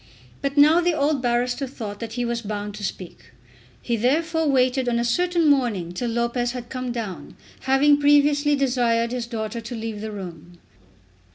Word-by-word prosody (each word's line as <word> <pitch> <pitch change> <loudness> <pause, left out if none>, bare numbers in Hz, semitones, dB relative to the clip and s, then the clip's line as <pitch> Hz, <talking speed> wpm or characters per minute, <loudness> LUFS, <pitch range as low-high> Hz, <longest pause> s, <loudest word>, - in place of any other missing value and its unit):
But 280 0 -3
now 305 +4 +6
the 350 -1 +1
old 285 -2 +1
barrister 245 +2 0
thought 215 -5 -7
that 225 -1 -6
he 245 0 -2
was 235 0 -2
bound 205 -1 -5
to 210 0 -8
speak. 185 -2 -6 0.6
He 235 - 0
therefore 320 +7 +1
waited 255 -1 +2
on 235 - 0
a 235 - 0
certain 345 +6 +1
morning 235 - +1
till 235 +7 -3
Lopez 235 +1 -1
had 245 -1 -7
come 255 -1 -3
down, 225 -6 -6 0.3
having 285 +2 +5
previously 290 0 +4
desired 240 -4 +1
his 245 -2 -3
daughter 230 0 -4
to 235 +2 -7
leave 220 -2 -5
the 220 0 -5
room. 175 -4 -9
245 Hz, 175 wpm, -23 LUFS, 225-280 Hz, 0.6 s, now